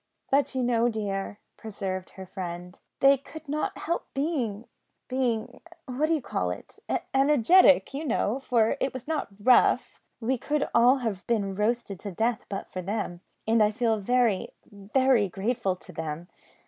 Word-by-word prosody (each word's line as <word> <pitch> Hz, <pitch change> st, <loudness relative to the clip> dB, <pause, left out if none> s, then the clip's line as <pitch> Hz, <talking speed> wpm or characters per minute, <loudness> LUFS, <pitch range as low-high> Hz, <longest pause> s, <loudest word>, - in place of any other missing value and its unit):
"But 275 Hz, 0 st, +2 dB
you 260 Hz, -, 0 dB
know, 240 Hz, -1 st, +2 dB
dear," 205 Hz, -3 st, -3 dB, 0.2 s
persevered 195 Hz, -4 st, -5 dB
her 190 Hz, -, -8 dB
friend, 180 Hz, 0 st, -7 dB, 0.2 s
"they 275 Hz, 0 st, +7 dB
could 315 Hz, +3 st, -12 dB
not 300 Hz, +2 st, -2 dB
help 340 Hz, +2 st, -3 dB
being 255 Hz, -8 st, -1 dB, 0.4 s
being 245 Hz, -4 st, -2 dB, 0.2 s
what 265 Hz, +4 st, -1 dB
d'you 315 Hz, -4 st, 0 dB
call 90 Hz, -, -2 dB
it? 90 Hz, -, -8 dB, 0.3 s
energetic, 285 Hz, +3 st, +5 dB
you 285 Hz, +3 st, -3 dB
know, 240 Hz, 0 st, 0 dB
for 240 Hz, -2 st, +1 dB
it 265 Hz, -, -1 dB
was 255 Hz, 0 st, -7 dB
not 315 Hz, -1 st, -1 dB
rough. 250 Hz, +4 st, +4 dB, 0.2 s
We 245 Hz, +2 st, -1 dB
should 295 Hz, -1 st, 0 dB
all 245 Hz, +3 st, +6 dB
have 200 Hz, -4 st, -3 dB
been 205 Hz, -5 st, 0 dB
roasted 210 Hz, -1 st, -1 dB
to 200 Hz, -, -6 dB
death 225 Hz, +5 st, -1 dB
but 195 Hz, -, -5 dB
for 185 Hz, -, -4 dB
them, 185 Hz, -2 st, -3 dB, 0.3 s
and 225 Hz, 0 st, +4 dB
I 210 Hz, -, +5 dB
feel 225 Hz, 0 st, 0 dB
very, 235 Hz, -2 st, +2 dB, 0.2 s
very 215 Hz, +2 st, +1 dB
grateful 195 Hz, +1 st, -1 dB
to 185 Hz, -, -10 dB
them. 160 Hz, +2 st, -5 dB
230 Hz, 160 wpm, -27 LUFS, 195-265 Hz, 0.4 s, they